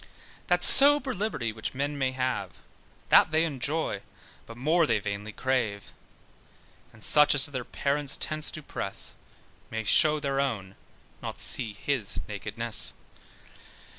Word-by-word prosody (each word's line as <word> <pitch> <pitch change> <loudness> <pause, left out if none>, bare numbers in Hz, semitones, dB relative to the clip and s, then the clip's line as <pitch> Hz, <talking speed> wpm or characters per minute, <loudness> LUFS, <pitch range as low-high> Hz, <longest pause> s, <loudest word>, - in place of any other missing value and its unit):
That - - 0
sober 280 -1 +8
liberty 180 - -4
which 110 +2 -6
men 145 +2 -3
may 135 -2 -1
have, 130 -1 -4 0.5
That - - +5
they 160 +1 +1
enjoy, 150 +1 -3 0.5
but 115 - -12
more 160 +6 +1
they - - +1
vainly 100 +1 -6
crave: 115 -5 -3 1.0
And 110 - -20
such 150 -1 +3
as 135 - +7
to - - -2
their 130 -3 -5
parents' 140 +2 0
tents 155 0 -2
do 155 - -8
press, - - -5 0.6
May 110 0 -5
show 150 +8 +3
their 140 -2 -3
own, 110 -9 -3 0.5
not - - -7
see 110 -4 0
his 115 0 -2
nakedness. - - -3
135 Hz, 135 wpm, -26 LUFS, 115-150 Hz, 1.0 s, sober